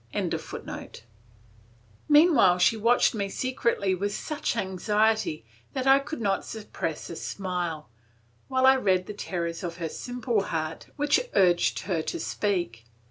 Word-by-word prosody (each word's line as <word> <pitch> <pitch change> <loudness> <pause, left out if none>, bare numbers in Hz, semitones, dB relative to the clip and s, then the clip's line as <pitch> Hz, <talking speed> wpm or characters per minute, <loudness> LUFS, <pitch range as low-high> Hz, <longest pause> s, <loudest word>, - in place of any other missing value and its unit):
] - - -31 2.0
Meanwhile 295 - +6
she 180 +5 +4
watched 230 +3 +3
me 200 -3 -2
secretly 235 -4 0
with 200 +3 -2
such 305 -5 -3
anxiety 210 - 0 0.3
that 260 -1 -2
I 270 +1 +6
could 285 +1 -6
not 200 -3 0
suppress 190 -8 -5
a - - -6
smile, 175 -5 -4 0.6
while 260 -1 +2
I 265 0 +7
read 185 -7 +2
the 210 - -6
terrors 170 -4 -4
of 170 -1 -4
her 165 -2 -3
simple 245 +1 -2
heart 160 0 -4
which 295 +11 +1
urged 175 -2 +3
her 175 -5 -1
to 345 - -4
speak. 175 - -2
200 Hz, 135 wpm, -27 LUFS, 175-245 Hz, 2.0 s, I